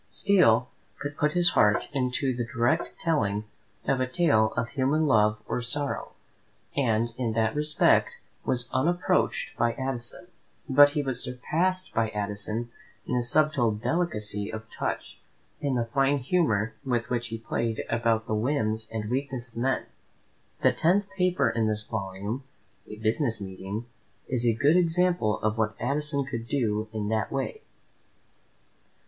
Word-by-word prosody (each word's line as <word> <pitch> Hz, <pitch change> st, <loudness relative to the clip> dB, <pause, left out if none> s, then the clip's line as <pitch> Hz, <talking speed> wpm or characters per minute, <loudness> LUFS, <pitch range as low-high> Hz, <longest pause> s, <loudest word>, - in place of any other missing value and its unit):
Steele 125 Hz, -, +4 dB, 0.3 s
could 145 Hz, +1 st, -5 dB
put 150 Hz, +1 st, +1 dB
his 175 Hz, 0 st, +5 dB
heart 105 Hz, 0 st, +3 dB
into 130 Hz, -1 st, 0 dB
the 120 Hz, -, -1 dB
direct 120 Hz, +7 st, 0 dB
telling 105 Hz, -, 0 dB, 0.4 s
of 135 Hz, -1 st, +1 dB
a 130 Hz, -, +1 dB
tale 130 Hz, -8 st, +3 dB
of 115 Hz, 0 st, 0 dB
human 140 Hz, +3 st, +1 dB
love 105 Hz, -5 st, +4 dB
or -, -, -1 dB
sorrow, 140 Hz, +4 st, -3 dB, 0.6 s
and 115 Hz, -3 st, +1 dB
in 115 Hz, -3 st, 0 dB
that 110 Hz, 0 st, +1 dB
respect 150 Hz, -, +2 dB, 0.3 s
was 125 Hz, -1 st, -1 dB
unapproached 175 Hz, +7 st, +1 dB
by 120 Hz, 0 st, +2 dB
Addison; 130 Hz, +5 st, -3 dB, 0.4 s
but 145 Hz, +1 st, +7 dB
he 150 Hz, -2 st, 0 dB
was 130 Hz, -3 st, -2 dB
surpassed 175 Hz, +9 st, -1 dB
by 110 Hz, -1 st, +1 dB
Addison 105 Hz, +3 st, -3 dB, 0.3 s
in 125 Hz, -, -2 dB
a 125 Hz, -, +2 dB
subtle 130 Hz, -2 st, +2 dB
delicacy 105 Hz, -, -1 dB
of 110 Hz, 0 st, -6 dB
touch, -, -, -4 dB, 0.4 s
in 140 Hz, -2 st, -1 dB
the 120 Hz, -1 st, +1 dB
fine 135 Hz, +4 st, +2 dB
humour 120 Hz, -, +1 dB
with 120 Hz, -3 st, -1 dB
which 120 Hz, -1 st, -1 dB
he 115 Hz, 0 st, -4 dB
played 115 Hz, 0 st, -2 dB
about 115 Hz, -1 st, +1 dB
the 110 Hz, -, -3 dB
whims 110 Hz, -2 st, 0 dB
and 110 Hz, -2 st, -3 dB
weaknesses 130 Hz, -1 st, -3 dB
of -, -, -14 dB
men. 130 Hz, +1 st, 0 dB, 0.8 s
The -, -, +6 dB
tenth 195 Hz, +4 st, +1 dB
paper 180 Hz, -7 st, +2 dB
in 115 Hz, -1 st, +1 dB
this 105 Hz, -1 st, 0 dB
volume, 100 Hz, +4 st, -4 dB, 0.4 s
"A 105 Hz, -, -8 dB
Business 110 Hz, +2 st, 0 dB
Meeting," 95 Hz, +3 st, -6 dB, 0.4 s
is 120 Hz, -2 st, 0 dB
a 115 Hz, -, +4 dB
good 145 Hz, +8 st, +4 dB
example 175 Hz, -9 st, +2 dB
of 110 Hz, +1 st, 0 dB
what 110 Hz, -2 st, 0 dB
Addison 140 Hz, +1 st, 0 dB
could 115 Hz, -4 st, -5 dB
do 110 Hz, -5 st, 0 dB
in 105 Hz, -2 st, -3 dB
that 110 Hz, 0 st, 0 dB
way. 135 Hz, -, -3 dB
120 Hz, 150 wpm, -27 LUFS, 110-145 Hz, 0.8 s, but